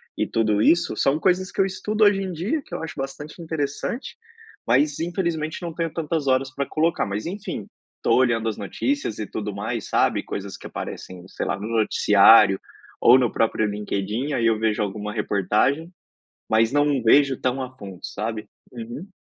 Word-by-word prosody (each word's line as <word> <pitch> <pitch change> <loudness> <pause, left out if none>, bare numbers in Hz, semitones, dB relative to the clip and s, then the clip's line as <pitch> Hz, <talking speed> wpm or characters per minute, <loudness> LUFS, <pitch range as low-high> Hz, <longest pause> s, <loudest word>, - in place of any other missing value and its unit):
e - - -1
tudo 110 -2 +1
isso, 170 +9 +3
são 140 +3 +2
coisas 185 +1 +1
que - - -9
eu 195 - +5
estudo 210 +3 -1
hoje 205 -1 +4
em 190 - -3
dia, 190 - -2
que 175 - -8
eu - - -5
acho 160 -1 -5
bastante 145 +4 -7
interessante, 160 - -4 0.5
mas 140 +5 +2
infelizmente 170 -2 -2
não 170 -1 -4
tenho 165 -1 -2
tantas 160 -2 -2
horas 130 0 +1
pra 140 +1 -2
colocar. 160 +2 +1
Mas 100 +2 -4
enfim, 180 - -5 0.4
tô - - +3
olhando 115 -3 +2
as 110 - -4
notícias 270 - -2
e 110 - -2
tudo 105 -1 -4
mais, 110 +2 -4
sabe? - - +2
Coisas 100 0 -6
que - - -9
aparecem, 90 -1 -7
sei - - -5
lá, - - -2
no 105 - -5
noticiário, 105 -2 +5 0.4
ou 125 +2 +8
no 125 -3 +1
próprio 110 -1 +1
LinkedIn, 105 +6 -3
aí 115 - 0
eu 115 -1 +3
vejo 110 0 0
alguma 105 +1 -3
reportagem. 115 - 0 0.6
Mas 110 +1 +3
não 145 -2 +2
vejo 135 +3 +4
tão 130 +1 -1
a 130 0 -7
fundo, 95 -6 -9
sabe? 110 0 -4 0.2
Uhum. 120 - -8
130 Hz, 180 wpm, -23 LUFS, 110-160 Hz, 0.6 s, ou